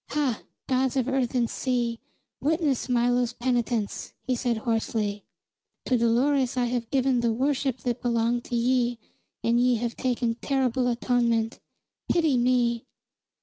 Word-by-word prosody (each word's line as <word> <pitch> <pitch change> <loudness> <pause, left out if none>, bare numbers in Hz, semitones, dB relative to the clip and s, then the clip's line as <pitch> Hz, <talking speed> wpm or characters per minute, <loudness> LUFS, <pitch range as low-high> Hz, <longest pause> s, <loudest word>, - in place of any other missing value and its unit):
"Hah, 280 -7 0 0.2
gods 260 0 +1
of 255 -1 +1
earth 265 -2 0
and 240 -2 +2
sea, 240 -2 -1 0.4
witness 295 -4 0
Milo's 245 0 +2
penitence!" 240 -3 -1
he 260 - -1
said 240 -1 0
hoarsely. 220 -2 -1 0.6
"To 255 - +2
Dolores 250 +3 +2
I 245 - +2
have 240 -1 -2
given 265 -2 +2
the 235 -1 +1
worship 265 +1 0
that 240 -1 -2
belonged 235 0 +1
to 240 - -3
ye 240 0 +1 0.5
and 235 +1 +3
ye 250 0 +4
have 235 0 -2
taken 240 -2 -1
terrible 260 -2 +1
atonement. 235 -2 +1 0.5
Pity 320 -5 +3
me!" 240 -1 +1
245 Hz, 140 wpm, -26 LUFS, 235-260 Hz, 0.6 s, ye